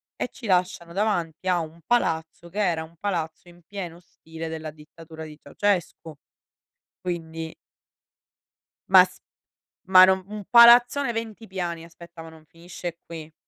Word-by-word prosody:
e - - -3
ci 230 - -9
lasciano 180 -2 0
davanti 185 -4 -1
a 180 -1 +2
un 165 +1 -7
palazzo 170 -7 -1
che 205 +5 -6
era 170 -5 +1
un 165 +1 -15
palazzo 175 -4 -3
in 175 0 -18
pieno 180 -4 -7
stile 165 -2 -10
della 160 -1 -6
dittatura 160 +1 -12
di 155 -1 -10
Ceaușescu. 180 -5 -2 0.9
Quindi 165 -2 -5 1.4
Ma 185 -1 +9
s 180 0 -13 0.7
ma 185 -1 +9
non 190 0 +1
un 210 -1 -7
palazzone 240 +2 +7
20 225 -1 -6
piani, 175 -3 -4
aspetta, 170 0 -13
ma 165 - -11
non 160 -1 -17
finisce 170 +1 -8
qui. 160 -2 -9
170 Hz, 145 wpm, -24 LUFS, 160-190 Hz, 1.4 s, Ma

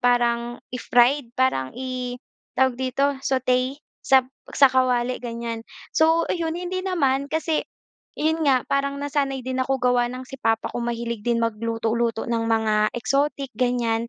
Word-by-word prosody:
parang 240 -1 +1
i-fried, 245 +1 +2
parang 240 - 0
i 255 -1 -4 0.4
tawag 260 -2 +4
dito, 260 +1 0 0.2
sauté 255 0 +1 0.3
sa 265 -1 +5 0.3
sa 275 - +6
kawali, 255 -1 +1
ganiyan. 235 -1 -4 0.3
So 325 +1 +4
ayun, 330 -1 -2
hindi 360 +1 -3
naman, 280 -7 +1
kasi 320 0 0 0.6
'yon 320 +1 +1
nga, 255 -2 +3
parang 280 0 0
nasanay 280 -3 -1
din 260 0 -1
ako 270 +1 0
gawa 245 -1 +2
ng 255 +1 -7
si 270 - -9
papa 225 -2 +1
ko 240 - -3
mahilig 235 -1 -3
din 235 +1 +1
magluto-luto 230 +1 -1
ng 230 -1 0
mga 215 -1 +2
exotic, 275 +1 0
ganiyan. 235 -2 0
250 Hz, 145 wpm, -23 LUFS, 235-275 Hz, 0.6 s, sa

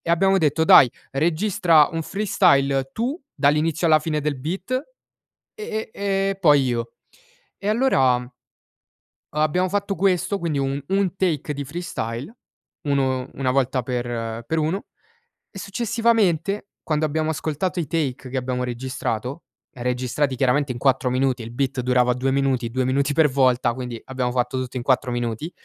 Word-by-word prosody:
e 165 - -4
abbiamo 195 +3 +3
detto: 160 -1 +2
"Dai, 135 - +8 0.2
registra 165 +1 +3
un 165 -1 -3
freestyle 140 -9 +2
tu, 255 +9 -2
dall'inizio 155 +3 +2
alla 155 -1 +6
fine 155 -1 -2
del 145 -1 -1
beat, 180 - -5 0.8
e 225 - -5
e 195 -1 0
e 195 - -3
poi 145 -6 +5
io". 120 -2 -2 0.7
E 205 - -4
allora, 135 - +2 1.1
abbiamo 155 +5 +1
fatto 200 0 -1
questo 195 +2 +1
quindi 165 -6 -2
un 135 +1 -1
un 195 -1 0
take 160 -6 -1
di 140 0 -4
freestyle, 145 - -5 0.5
uno 130 -2 0
una 130 -2 -1
volta 130 -1 +1
per 120 -2 -4
per 160 - -1
uno 160 +6 -1 0.7
e 195 - -9
successivamente, 210 -3 0 0.2
quando 155 -1 0
abbiamo 155 +1 -1
ascoltato 160 +5 -2
i 160 - -2
take 135 -5 -2
che 130 - -3
abbiamo 125 0 -2
registrato, 125 +2 -4 0.3
registrati 125 +2 -1
chiaramente 135 +2 +1
in 120 - -6
4 130 -1 +2
minuti, 130 -1 +1
e - - -7
il 115 - -8
beat 130 +1 -1
durava 125 0 +2
2 130 +2 -1
minuti, 135 -3 0
2 130 0 0
minuti 140 +2 +1
per 155 0 +4
volta, 130 -3 +2
quindi 125 -2 -6
abbiamo 130 -2 -2
fatto 125 +1 -1
tutto 130 0 -4
in 120 - -4
4 130 -1 +1
minuti, 120 +6 -3
140 Hz, 155 wpm, -23 LUFS, 125-175 Hz, 1.1 s, Dai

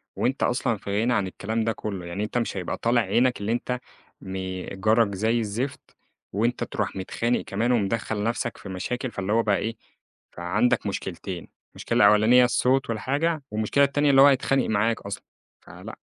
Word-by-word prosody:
وأنت 135 +2 0
أصلًا 120 -2 +1
في 100 +1 -2
غِنى 120 +2 +2
عن 100 -5 +1
الكلام 110 +4 -3
ده 115 - +1
كلّه، 100 -4 -5
يعني 85 +4 -4
أنت 110 +3 -3
مش 115 -4 -2
هيبقى 90 - -3
طالع 120 +1 +2
عينك 125 0 +1
اللي 100 +2 -1
أنت 125 +1 -2 0.4
م 95 0 -7 0.4
جارك 110 +1 +2
زي 110 +4 +1
الزفت، 115 +5 -4 0.4
وأنت 115 +5 0
تروح - - -3
متخانق 115 +5 -1
كمان، 115 +5 -1
ومدخل 110 -1 0
نفسك 115 +1 -2
في 100 - -10
مشاكل، 120 +7 -3
فاللي 100 +1 -2
هو 115 +1 +3
بقى 105 -2 +2
إيه، 115 +1 -3 0.6
فعندك 100 +6 0
مشكلتين، 95 -2 -5 0.3
مشكلة - - +2
أولانية 110 +4 +6
الصوت 130 +2 +1
والحاجة، 140 +8 -1
والمشكلة 110 +6 +2
التانية 145 +1 +2
اللي 135 - +6
هو 140 - +9
هيتخانق 135 -1 +2
معاك 110 +2 +1
أصلًا. 100 0 -6 0.4
فلأ. - - -11
115 Hz, 170 wpm, -25 LUFS, 100-125 Hz, 0.6 s, هو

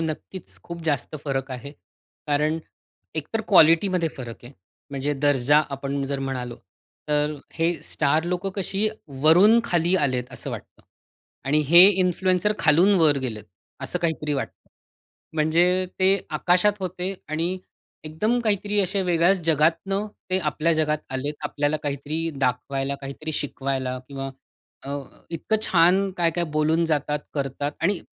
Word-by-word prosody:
नक्कीच. 165 +3 -6
खूप 170 0 -7
जास्त 150 -3 -1
फरक 135 -1 -2
आहे. 130 +2 -6 0.6
कारण 150 +2 +1 0.6
एकतर 160 +9 -2
क्वालिटीमध्ये 170 0 +5
फरक 120 -2 -8
आहे. 125 - -11 0.4
म्हणजे 140 +1 -2
दर्जा 145 +1 +4
आपण 140 0 -3
जर 140 0 -3
म्हणालो, 125 -3 -4 0.5
तर 150 0 +1 0.2
हे 165 +1 +1 0.2
स्टार 155 +2 +1
लोकं 180 +2 -2
कशी 195 +2 0 0.3
वरून 185 +9 +7
खाली 175 -3 +1
आलेत 125 -2 -1
असं 125 - -4
वाटतं - - -9 0.6
आणि 145 +3 +2
हे 175 +3 +10
इन्फ्लुएन्सर 185 +1 +2
खालून 165 +6 +4
वर 150 -3 +5
गेलेत 110 -6 -5 0.4
असं 180 - -1
काहीतरी 160 -3 -1
वाटतं. 135 - -6 0.7
म्हणजे 175 +4 +2
ते 190 +1 +4
आकाशात 180 +6 +3
होते 185 +1 -3
आणि 165 +4 -1 0.5
एकदम 210 +11 0
काहीतरी 205 -1 0
असे 195 +1 0
वेगळ्याच 175 +1 +2
जगातनं 165 +6 +1 0.2
ते 185 - +2
आपल्या 160 0 0
जगात 155 -1 +1
आलेत. 135 +3 -3
आपल्याला 145 +1 0
काहीतरी 150 +3 -3
दाखवायला 135 +2 -1
काहीतरी 140 +3 -6
शिकवायला 135 -3 -3
किंवा 135 -1 -5 0.5
अ, 140 - -7 0.4
इतकं 170 +6 -1
छान 185 +3 +3
काय-काय 170 0 +1
बोलून 155 +2 +2
जातात, 150 -1 0 0.2
करतात 140 +1 -3
आणि 190 +2 +2
155 Hz, 130 wpm, -24 LUFS, 140-180 Hz, 0.7 s, हे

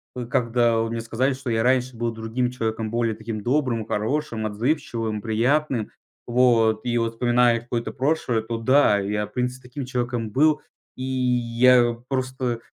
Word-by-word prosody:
ы, 125 -1 -4
когда 120 -2 +2
вот 115 0 -1
мне 115 0 -3
сказали, 125 +4 0
что 130 -1 -6
я 115 0 +1
раньше 130 -1 +1
был 115 0 -2
другим 115 +3 -2
человеком, 110 -2 -3
более 115 -2 0
таким 110 -1 -6
добрым 125 -2 0
и - - -16
хорошим, 115 0 -2
отзывчивым, 115 -2 -2
приятным, 120 +2 0 0.4
вот. 120 -2 +3
И 120 -1 0
вот 115 0 0
вспоминая 120 0 +3
какое-то 120 -1 -3
прошлое, 130 -4 0
то 115 +1 -4
да, 115 -3 +4
я 105 +1 -2
в 105 - -23
принципе 125 0 -3
таким 130 +1 -6
человеком 120 -3 -2
был. 150 +6 +3 0.4
И 130 - -5
я 125 -1 +3
просто 130 -2 -2
120 Hz, 165 wpm, -23 LUFS, 115-130 Hz, 0.4 s, да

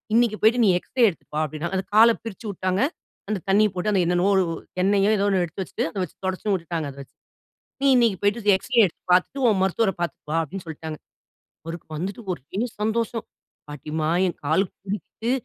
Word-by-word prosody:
"இன்னைக்கு 230 -2 +3
போய்ட்டு, 235 +2 +5
நீ 195 - +5
எக்ஸ்ரே 245 +6 +2
எடுத்துட்டு 165 - -13
வா" 155 - +2
அப்டின்னாங்க. 155 +5 -4
அந்த 190 - -5
கால 230 +1 +7
பிரிச்சு 225 0 -7
வுட்டாங்க. 185 +1 -1 0.5
அந்த 210 -2 -1
தண்ணிய 210 +2 +5
போட்டு, 185 +4 0
அந்த 190 - +3
என்னென்னவோ, 180 +3 +2 0.5
எண்ணெயோ, 200 +1 +3
ஏதோ 200 - +2
ஒண்ணு 190 -2 +2
எடுத்து 175 +3 -5
வச்சுட்டு, - - -3
அத - - -10
வச்சு - - -7
தொடச்சும் 190 +2 -1
வுட்டுட்டாங்க, 165 -4 -2
அத 135 - -16
வச்சு. - - -25 0.7
"நீ - - +3
இன்னைக்கு 230 -5 +3
போய்ட்டு, 205 +1 +2
எக்ஸ்ரே 245 +4 +1
எடுத்து 170 - -11
பார்த்துட்டு, 185 +9 +1
உன் 205 -4 +2
மருத்துவரை 195 +2 +1
பார்த்துட்டு 175 - -4
வா" - - +1
அப்டின்னு 180 +4 -8
சொல்ட்டாங்க. 160 0 -6 0.7
அவருக்கு 165 0 -7
வந்துட்டு 190 +8 -4
ஒரே 175 +6 -7 0.2
சந்தோஷம். 225 +1 -1 0.5
"பாட்டிம்மா 155 +2 -3 0.2
என் 175 - -3
கால் 160 +6 +3
கூடிட்டு. 205 +4 -5
195 Hz, 185 wpm, -24 LUFS, 170-215 Hz, 0.7 s, கால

